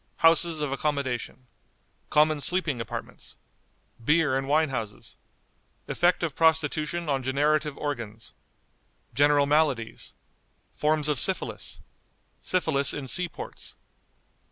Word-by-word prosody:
Houses 165 -1 +6
of 145 -2 -1
Accommodation. 135 -3 -2 0.6
Common 150 0 +3
Sleeping 155 -7 0
Apartments. 115 - -8 0.7
Beer 150 0 +3
and 135 0 -1
Wine 155 +2 +3
Houses. 110 -6 -5 0.7
Effect 175 0 +2
of 160 -4 -2
Prostitution 160 +1 +1
on 135 -2 0
Generative 145 +3 +1
Organs. 115 -7 -5 0.8
General 145 0 +4
Maladies. 145 -6 0 0.6
Forms 150 0 +1
of 150 -4 +1
Syphilis. 190 +6 -3 0.6
Syphilis 160 -6 +1
in 140 -2 -5
Sea 180 +8 0
ports. - - -7
150 Hz, 105 wpm, -27 LUFS, 135-160 Hz, 0.8 s, Houses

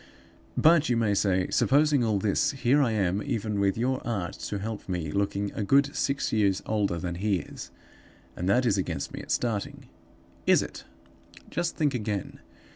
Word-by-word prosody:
"'But,' 160 -2 +5
you 120 - +2
may 110 -3 +2
say, 95 -2 +1
'supposing 145 -1 +3
all 110 -3 +1
this, 100 +7 +1
here 135 +2 +2
I 130 - +2
am, 100 -2 0
even 110 -6 -2
with 100 0 +1
your 130 +3 0
art 100 -7 -3 0.2
to 105 - -2
help 105 0 -6
me, 85 -4 -2
looking 100 +2 -1
a 105 - -3
good 140 +6 +3
six 140 0 -1
years 100 -3 +2
older 105 -5 0
than 85 +1 -3
he 100 +3 0
is; 90 - -7 0.7
and 90 +2 -2
that 125 +5 +3
is 100 -4 +2
against 95 - -3
me - - -5
at - - -13
starting.' 110 -5 -2 0.6
Is - - +5
it? - - -9 0.7
Just 170 - -1
think 145 -3 +1
again. 105 -5 -3
105 Hz, 180 wpm, -27 LUFS, 100-125 Hz, 0.7 s, But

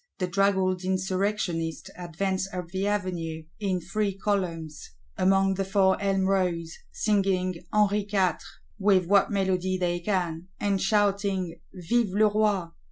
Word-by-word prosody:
The 185 - 0
draggled 190 0 +1
Insurrectionists 185 -2 -1
advance 190 +2 -2
up 180 -2 -5
the 190 +2 -2
Avenue, 175 -6 -2 0.2
"in 190 -3 0
three 195 +3 -2
columns", 165 - -3 0.2
among 195 +1 +3
the 195 +1 -1
four 195 0 +2
Elm 195 -1 +1
rows; 180 -4 0 0.2
"singing 190 -4 0
Henri 210 -1 +2
Quatre," 190 -3 +1 0.4
with 195 -2 +3
what 200 +2 +4
melody 185 -2 0
they 175 -1 0
can; 175 -3 -2
and 200 -2 0
shouting 195 -3 +1
Vive 200 +2 0
le 215 0 +5
Roi. 205 -5 +1
190 Hz, 130 wpm, -27 LUFS, 180-200 Hz, 0.4 s, le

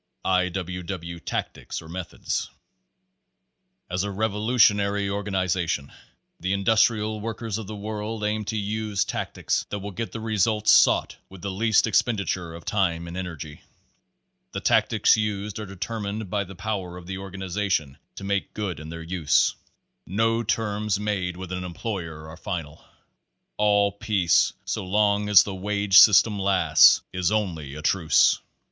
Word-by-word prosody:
I. 90 -1 +2
W. 90 0 -4
W. 85 -1 -6
Tactics - - -4
or 80 - -12
Methods 90 +2 -4 1.4
As 90 +1 -2
a 100 - -2
revolutionary 105 -1 +2
organization 95 -7 -1 0.5
the 95 +3 -1
Industrial 110 +1 +2
Workers 115 0 -4
of 110 - -7
the 110 - -6
World 105 +1 -5
aims 105 0 -1
to 110 - -2
use 105 0 -1
tactics - - -2
that 105 - -3
will 100 +1 -6
get 115 +4 -5
the 115 - -6
results 110 -1 +2
sought - - +4
with 95 -1 -13
the 100 - -2
least 110 +3 +3
expenditure 100 -6 0
of 85 - -11
time 85 -5 0
and 85 - -7
energy. 80 -5 -7 0.9
The - - -2
tactics - - +3
used 105 -1 -3
are 105 - -6
determined 100 +1 -5
by 100 -1 0
the 95 +1 -11
power 95 -3 -4
of 90 - -11
the 95 +1 -5
organization 95 -5 -3 0.2
to - - -9
make 100 0 -2
good 100 -6 -3
in 75 0 -9
their 85 0 -7
use. 85 -3 +2 0.5
No 115 +4 +1
terms 105 -2 -1
made 95 -4 -2
with 95 -1 -7
an 90 0 -3
employer 85 -4 -5
are 80 +2 -10
final. 80 -6 -6 0.7
All 100 -1 +3
peace 100 -4 +2
so - - -3
long 105 +1 +1
as 100 -3 +8
the 100 - -5
wage 100 0 +4
system 105 0 +6
lasts, 95 -5 +5
is 90 -1 0
only 85 -10 -2
a 75 - -8
truce. 85 -2 +3
100 Hz, 150 wpm, -25 LUFS, 90-105 Hz, 1.4 s, as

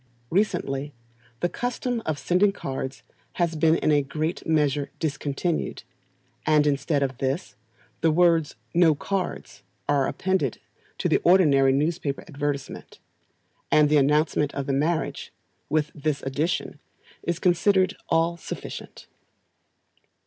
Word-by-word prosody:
Recently, 145 - 0 0.5
the - - +3
custom 245 +3 -2
of 155 -2 0
sending 180 +8 +3
cards 135 -6 -5 0.3
has 170 -2 0
been 160 +1 +4
in 155 - +1
a 145 -1 +4
great 155 +4 -3
measure 150 -3 +1
discontinued, 150 +2 -2 0.6
and 150 -1 +4
instead 145 0 +1
of 130 -2 -3
this, 135 +7 -2 0.5
the 165 - +4
words 165 -1 +3 0.2
"No 165 -3 +5
cards" 190 +5 -4 0.3
are 140 -2 +2
appended 185 - -1 0.4
to - - 0
the - - +3
ordinary 150 -7 +5
newspaper 145 0 -1
advertisement, 145 -3 -4 0.7
and 150 -1 +5
the 150 - +4
announcement 150 +1 +2
of 140 - -2
the 140 - -1
marriage, 155 +4 -1 0.4
with 150 0 +1
this 150 -1 -2
addition, 150 +8 -2 0.4
is 170 -1 -2
considered 185 +2 +3
all 165 +1 +2
sufficient. - - -8
155 Hz, 120 wpm, -25 LUFS, 140-170 Hz, 0.7 s, No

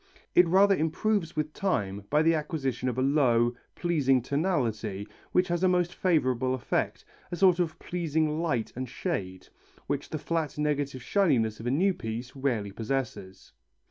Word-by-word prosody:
It 180 0 +6
rather 195 +3 +5
improves 170 +2 0
with 155 0 -2
time 100 - -1
by 150 +1 +3
the 165 +1 +4
acquisition 150 -5 -2
of 125 - -4
a 130 - +1
low, 125 -4 +3 0.2
pleasing 145 -7 +2
tonality 115 - -1 0.2
which 180 0 +3
has 175 0 0
a - - +5
most 180 -1 +1
favourable 130 -7 +1
effect, 130 - -2 0.3
a - - -2
sort 185 -1 +4
of 165 -3 -1
pleasing 160 -2 -1
light 125 -10 -1
and 130 0 -4
shade, 95 - -4 0.4
which 140 0 -3
the 155 - -3
flat 155 -1 -2
negative 145 -4 -1
shininess 125 - +2
of 115 - -5
a - - +2
new 185 +9 +2
piece 120 -2 -6
rarely 120 -7 -1
possesses. 115 -4 -4
145 Hz, 160 wpm, -28 LUFS, 120-170 Hz, 0.4 s, It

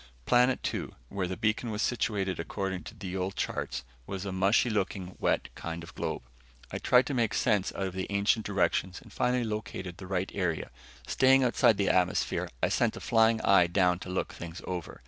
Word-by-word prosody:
Planet 125 +1 +3
two, - - -3
where 95 -2 -2
the 95 - -4
beacon 110 +2 0
was 105 0 -1
situated 100 -6 -1
according 95 +2 -3
to 110 - -9
the 95 -3 -6
old 95 +1 -2
charts, 65 -1 -3 0.2
was 95 0 -4
a 100 - -3
mushy 95 +6 +3
looking, 95 -3 -2
wet - - +1
kind 85 0 -6
of 85 - -11
globe. - - -3 0.5
I - - -3
tried 125 0 +4
to 145 - -3
make 120 -4 +1
sense 105 -5 +2
out 95 - -1
of 95 - -4
the 95 0 -3
ancient 100 +2 +2
directions 95 -2 0
and - - -16
finally 125 0 +1
located 105 -5 -4
the 95 - -9
right 95 0 -1
area. 90 -5 -2 0.3
Staying 135 0 +4
outside 115 -3 +4
the 100 - +2
atmosphere, 90 -1 +1
I - - +4
sent - - +1
a - - -6
flying 115 -1 +3
eye 95 -3 +5
down 90 0 +2
to 95 - -8
look 90 - -2
things 85 +1 -8
over. 90 -3 -5
95 Hz, 200 wpm, -29 LUFS, 90-110 Hz, 0.5 s, eye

